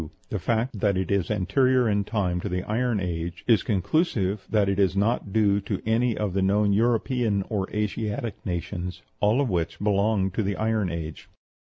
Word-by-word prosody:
The 105 - -2
fact 115 +4 -1
that 100 -1 +2
it 95 -1 -2
is 100 -3 +1
anterior 125 +5 +2
in 100 -1 +1
time 95 -5 -1
to 100 - -3
the 90 0 -2
Iron 115 0 0
Age 85 -1 -4
is 115 -6 +4
conclusive 100 - 0
that 105 -2 +2
it 100 0 0
is 95 -1 +3
not 105 0 0
due 100 -1 +3
to - - -3
any 115 +1 +1
of 105 -4 -1
the 95 - +1
known 100 +1 +3
European 115 -1 +1
or 100 -4 -2
Asiatic 105 0 -3
nations, 90 0 -4 0.2
all 105 +5 +3
of 140 -3 +1
which 85 -2 -1
belong 100 -1 +1
to 110 - -1
the 100 -1 -1
Iron 110 -2 0
Age. 80 -2 -6
100 Hz, 185 wpm, -25 LUFS, 95-110 Hz, 0.2 s, is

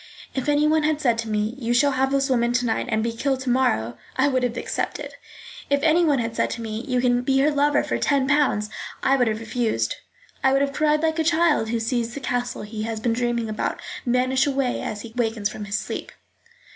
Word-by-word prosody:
If 265 +2 -2
anyone 300 +2 +3
had 305 0 +1
said 240 -6 +1
to 230 -1 -3
me, 215 +1 0
You 240 -1 0
shall 280 +3 +4
have 265 0 +1
this 275 0 +1
woman 240 -2 +1
to 250 0 +1
night 225 - -1
and 220 -1 +1
be 230 - 0
killed 265 +3 -1
tomorrow, 180 - 0 0.2
I 270 +2 +3
would 260 -2 +1
have 245 -1 -1
accepted. - - -3 0.6
If 280 0 +1
anyone 320 -2 +4
had 230 -1 -2
said - - +1
to 235 - -4
me, 220 +1 -4
you 250 -2 +1
can 245 -1 +2
be 270 +2 +1
her 300 +2 +3
lover 290 0 +2
for 295 - -2
ten 275 -2 +2
pounds, 270 -8 +2 0.3
I 270 - +4
would 250 -3 +2
have 215 0 -1
refused. 230 0 -1 0.5
I 265 - +4
would 275 - +3
have 280 0 -2
cried 305 +1 +2
like 320 0 +1
a - - +3
child 315 -7 +2
who 230 0 0
sees 235 +1 -1
the - - -4
castle 245 -3 -2
he 215 +1 -6
has 225 0 -3
been 230 +1 0
dreaming 240 -1 -1
about 215 -1 -2 0.2
vanish 255 +2 +2
away 270 -3 0
as 210 - -4
he 230 - -9
awakens 225 -3 0
from 210 -1 -7
sleep. 205 - -3
250 Hz, 220 wpm, -23 LUFS, 230-280 Hz, 0.6 s, shall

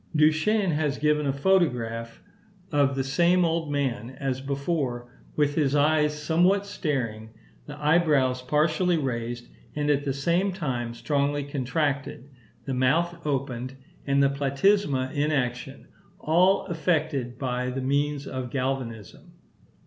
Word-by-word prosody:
Duchenne 160 +6 +3
has 150 -2 0
given 150 -1 +1
a - - +2
photograph 125 -8 +1
(fig. 195 - -27
21) 145 -2 +3
of 135 - -5
the 135 - 0
same 170 +6 +3
old 165 -2 -1
man 130 -5 -1
as 130 -1 -2
before, 135 -3 -2 0.2
with 145 -1 +2
his 145 -2 +1
eyes 150 0 +2
somewhat 175 +6 +2
staring, 125 - -3 0.4
the 145 0 -8
eyebrows 150 -5 +2
partially 155 +6 +1
raised, 120 -4 -3 0.3
and 150 0 +1
at 145 0 +1
the 140 - -1
same 170 +8 +1
time 125 -9 -3
strongly 145 +2 0
contracted, 140 0 -2 0.3
the 135 - -3
mouth 165 +7 +1
opened, 130 -2 -3 0.3
and 140 0 +3
the 140 - +4
platysma 140 0 +1
in 150 +1 0
action, 125 -4 -3 0.3
all 180 +5 +3
effected 155 -7 -1
by 125 -1 -2
the 130 +1 -4
means 145 +2 0
of 130 -2 -5
galvanism. 125 -6 -4
145 Hz, 135 wpm, -26 LUFS, 130-155 Hz, 0.4 s, the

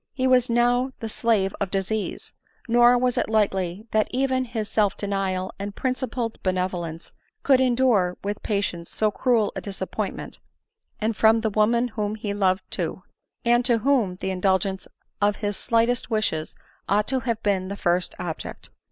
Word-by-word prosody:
He 260 -2 -1
was 255 -1 +4
now 245 +2 +2
the 225 - -4
slave 215 -3 +1
of 200 - 0
disease, 200 +3 -3 0.3
nor 240 +1 +6
was 250 0 +1
it - - -1
likely 195 -2 0
that 215 -1 +2
even 260 0 0
his 225 -3 -4
self 210 -2 +1
denial 195 -2 -2
and 200 0 -5
principled 255 -3 -2
benevolence 180 -3 -3 0.3
could 265 -2 +5
en 250 -2 +3
dure 210 -9 +2
with 205 +1 -3
patience 200 -5 -2
so 215 -1 +1
cruel 230 -1 +1
a - - -3
disappointment 195 -2 -5 0.3
— 450 0 -48
and 220 +1 0
from 220 +2 +4
the 220 -1 0
woman 235 +4 +2
whom 210 -1 -2
he 210 -2 -4
loved 190 -2 +1
too! - - -3 0.2
— - - -46
and 240 +1 +4
to 240 -3 +3
whom 230 -6 +2
the 190 - -4
indul 190 0 +2
gence 190 0 -4 0.3
of 205 0 +3
his 205 0 -3
slightest 230 +3 +1
wishes 215 -9 -1 0.3
ought 210 +1 +2
to 265 -1 +1
have 230 -2 -2
been 195 -2 +1
the 200 +1 -5
first 175 0 0
object. 165 -3 -6
215 Hz, 175 wpm, -24 LUFS, 195-240 Hz, 0.3 s, nor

